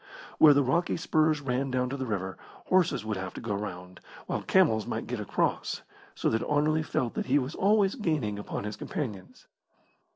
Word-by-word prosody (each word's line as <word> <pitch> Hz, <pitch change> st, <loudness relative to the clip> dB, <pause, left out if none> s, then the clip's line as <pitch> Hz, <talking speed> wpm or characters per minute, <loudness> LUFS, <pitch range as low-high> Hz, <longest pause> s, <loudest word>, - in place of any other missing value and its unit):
Where 150 Hz, -2 st, +8 dB
the 140 Hz, -, +4 dB
rocky 170 Hz, +7 st, +1 dB
spurs 155 Hz, -2 st, +2 dB
ran 135 Hz, 0 st, -1 dB
down 125 Hz, 0 st, 0 dB
to -, -, -2 dB
the 130 Hz, -2 st, -4 dB
river, 95 Hz, -3 st, -3 dB, 0.3 s
horses 175 Hz, -10 st, +2 dB
would 110 Hz, -2 st, -2 dB
have 95 Hz, -1 st, -6 dB
to -, -, -5 dB
go 115 Hz, -3 st, -3 dB
round, 90 Hz, -3 st, -6 dB, 0.3 s
while -, -, -2 dB
camels 150 Hz, -, +3 dB
might -, -, -3 dB
get -, -, -4 dB
across, -, -, -1 dB, 0.3 s
so -, -, -1 dB
that 110 Hz, -, +1 dB
Anerley 155 Hz, +1 st, +2 dB
felt 130 Hz, -6 st, -1 dB
that -, -, -3 dB
he 135 Hz, +2 st, +4 dB
was 135 Hz, +2 st, -1 dB
always 200 Hz, 0 st, +3 dB
gaining 150 Hz, -, -1 dB
upon 105 Hz, -, -5 dB
his 105 Hz, 0 st, -5 dB
companions. 105 Hz, -11 st, -6 dB
130 Hz, 190 wpm, -28 LUFS, 105-155 Hz, 0.3 s, Where